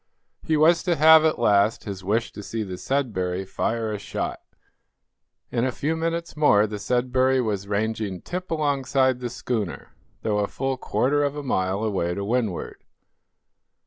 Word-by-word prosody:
He 155 - +1
was 165 +2 +5
to 175 -2 +1
have, 160 0 +7
at 155 - +2
last, 105 +2 +3
his 95 -3 -6
wish 110 +5 0
to - - -9
see 110 +2 -4
the 95 -3 -6
"Sudbury" 95 -9 -1
fire 110 +3 -2
a 105 - -4
shot. - - -4 1.1
In 120 -1 0
a 130 - +1
few 150 +6 -2
minutes 165 +1 -3
more 125 -9 +4
the 105 -1 -5
"Sudbury" 130 +3 +1
was 105 -5 -2
ranging 105 -2 -2
tip 180 +1 -5
alongside 135 -4 +1
the 125 -1 -4
schooner, 110 -6 -4 0.3
though 105 -2 +1
a 100 - +1
full 135 +4 -2
quarter 145 +3 +1
of 145 0 -1
a 145 - -5
mile 95 -5 0
away 95 -5 -1
to 100 - -3
windward. 110 -4 -2
120 Hz, 165 wpm, -24 LUFS, 100-140 Hz, 1.1 s, have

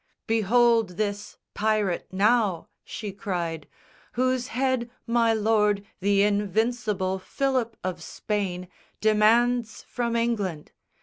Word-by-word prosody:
"Behold 225 -2 +2
this 205 0 -3 0.2
pirate, 210 -4 0
now," 200 -2 +2
she 210 -1 -6
cried, 175 -7 -4 0.5
"Whose 255 0 0
head 255 -1 -1 0.2
my 235 -1 +2
Lord, 210 -2 +2
the 200 +1 +3
Invincible, 205 -1 0
Philip 255 +2 -1
of 185 -2 -3
Spain 185 -1 -3 0.3
Demands 225 +2 +2
from 235 -1 -3
England. 205 -9 -1
215 Hz, 100 wpm, -26 LUFS, 195-235 Hz, 0.5 s, the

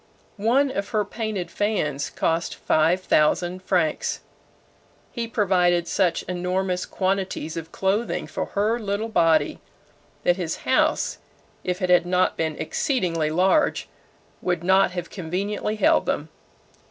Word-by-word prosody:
One 255 +7 +2
of 200 -4 -3
her 215 -3 0
painted 205 -4 -4
fans 205 -9 -1
cost 165 +1 -1
five 165 +4 +2
thousand 175 +2 +2
francs. 180 -5 0 0.9
He 235 -2 -3
provided 180 -6 +2
such 180 -4 +1
enormous 180 0 -2
quantities 190 -4 -2
of 165 0 -6
clothing 200 +5 -1
for - - -4
her 215 +4 +1
little 210 +1 -2
body, 165 -7 +2 0.6
that 175 +1 +3
his 170 -3 -2
house, 310 +4 +1 0.4
if 180 +1 -2
it 180 - +2
had 175 -1 +4
not 180 0 +2
been 160 -2 -1
exceedingly 175 - 0
large, 185 - +2 0.5
would 175 -2 -1
not 190 +2 +4
have 180 -1 -6
conveniently 200 +4 -3
held 315 +9 +3
them. - - -1
185 Hz, 130 wpm, -24 LUFS, 175-210 Hz, 0.9 s, had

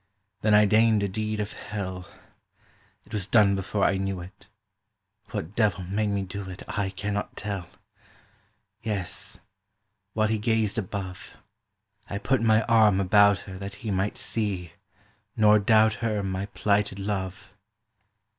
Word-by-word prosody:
Then 105 -1 +4
I 105 0 +7
deigned 110 0 +4
a - - +1
deed 110 +2 -3
of 105 0 -3
hell; 95 -3 -6 1.0
It 110 - -17
was 105 -3 -2
done 105 -4 +5
before 95 +1 -2
I 95 - +3
knew 95 -1 -2
it; 90 +2 -12 0.8
What 85 +7 -5
devil 105 -5 +1
made 100 +4 -1
me 100 -1 -1
do 95 +1 -6
it 90 - -8
I 100 -2 -1
cannot 100 +2 -4
tell! 100 -4 -4 1.1
Yes, 100 -5 -3 0.7
while 110 -1 +2
he 110 0 0
gazed 110 -1 +1
above, 95 -2 -6 0.7
I 100 - -3
put 115 +5 +1
my 110 -1 +4
arm 110 -4 +4
about 100 +1 +5
her 95 -1 -9
That 100 0 -6
he 105 - -1
might 95 +2 -1
see, 95 -7 -2 0.6
nor 105 -1 +6
doubt 110 +1 +4
her 110 -3 0
My 95 0 -3
plighted 100 -1 0
Love. 95 -1 -4
100 Hz, 145 wpm, -26 LUFS, 95-110 Hz, 1.1 s, I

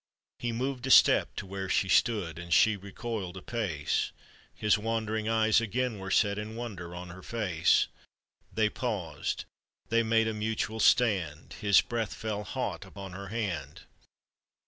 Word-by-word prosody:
He 120 - -2
moved 130 +2 -3
a - - -2
step - - +6
to - - -5
where 95 0 -5
she 95 - +2
stood, 95 -7 +2
And 85 0 -9
she 110 +5 +5
recoiled 100 -1 -5
a - - -7
pace; 95 -11 -1 0.4
His 105 -1 +3
wandering 110 0 -1
eyes 110 0 +4
again 115 0 -1
were 95 0 -6
set 100 +1 +2
In 110 +1 -6
wonder 95 -8 -6
on 90 0 -7
her 90 +2 -10
face. 95 -7 +2 0.7
They 110 -1 +2
paused, 100 - -3 0.4
they 115 +1 +3
made 115 0 +2
a 110 - -1
mutual 110 +1 -2
stand; 95 - +2
His 100 -2 +4
breath 115 -4 -3
fell 105 -2 -3
hot - - -3
upon 95 -2 -9
her 100 +2 -7
hand. 95 - -4
105 Hz, 155 wpm, -29 LUFS, 95-115 Hz, 0.7 s, step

